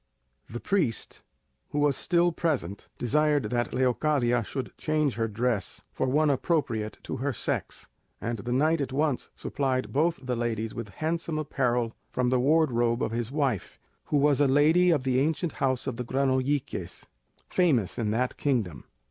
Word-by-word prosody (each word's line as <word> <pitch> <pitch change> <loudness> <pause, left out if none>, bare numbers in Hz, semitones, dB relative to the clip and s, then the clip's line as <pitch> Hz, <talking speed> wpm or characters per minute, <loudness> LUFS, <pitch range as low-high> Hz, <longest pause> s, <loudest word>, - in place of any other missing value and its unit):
The 120 - -5
priest, 160 - -1 0.5
who - - -4
was 145 -2 +3
still 175 0 +2
present, 135 - -2
desired 145 -2 +1
that 120 -1 0
Leocadia 125 -1 +1
should 130 +5 -5
change 155 -3 0
her 115 -1 -1
dress 115 0 -1
for 130 - -1
one 150 +3 +3
appropriate 125 -7 -1
to - - -4
her 140 +3 -1
sex, 120 - -3 0.3
and 115 -1 -3
the 120 +4 -4
knight 155 +5 +2
at 135 - -3
once 145 -1 0
supplied 130 -2 -2
both 165 +4 +2
the 125 -1 -1
ladies 115 -2 -2
with 115 -3 -6
handsome 160 - -2
apparel 125 -6 0 0.2
from 125 -1 0
the 130 - +3
wardrobe 125 -5 +2
of 110 - -1
his 115 +1 -3
wife, 135 - -1 0.3
who 150 - +1
was 145 0 +3
a 145 - +5
lady 155 +6 +4
of 155 -6 +2
the 130 -1 +2
ancient 160 +3 0
house 130 -2 -1
of 130 -4 -3
the 125 - -2
Granolliques, 130 +2 -1 0.4
famous 135 - +1
in 110 -2 0
that 125 +4 -1
kingdom. 105 - -1
130 Hz, 165 wpm, -27 LUFS, 120-150 Hz, 0.5 s, a